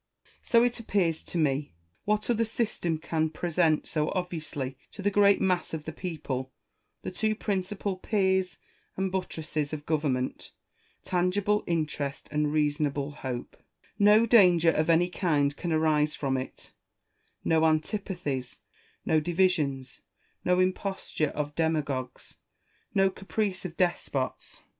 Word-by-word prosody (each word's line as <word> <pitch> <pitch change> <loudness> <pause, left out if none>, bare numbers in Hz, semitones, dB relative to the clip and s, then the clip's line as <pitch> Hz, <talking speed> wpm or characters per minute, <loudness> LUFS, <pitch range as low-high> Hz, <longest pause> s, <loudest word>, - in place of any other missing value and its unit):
So 235 0 +4
it 245 0 0
appears 185 -8 0
to - - -5
me. 145 - 0 0.3
What 210 0 +1
other 230 -1 +2
system 215 -7 -1
can 160 0 -1
present 165 -1 +1
so 150 -1 0
obviously 160 -7 -3 0.2
to 200 - -8
the 205 - +2
great 200 0 +5
mass 180 -3 0
of 150 -1 -7
the 160 - -4
people 145 -7 -4 0.5
the - - -4
two 215 +3 0
principal 195 -1 -2
piers 190 -2 +1 0.4
and 190 0 -1
buttresses 155 -5 -3
of 150 -1 -5
government, 145 -5 -1 0.5
tangible 195 +4 +1
interest 150 -4 -2
and 150 0 +1
reasonable 145 -1 0
hope 130 -4 -6
1 - - -35 0.3
No 210 +2 +6
danger 180 -8 +6
of 155 +1 0
any 165 +2 +5
kind 145 -7 +1
can 170 - -4
arise 155 -1 +2
from 135 -2 -1
it, 130 0 -6 0.7
no 160 -1 +3
antipathies, 155 - -1 0.4
no 160 - +3
divisions, 155 -7 0 0.4
no 180 0 +3
imposture 185 -4 0
of 145 0 -4
demagogues, 145 -6 -2 0.6
no 195 -1 +4
caprice 195 -1 -3
of 165 -2 -6
despots. 160 -7 -2
165 Hz, 130 wpm, -28 LUFS, 150-190 Hz, 0.7 s, No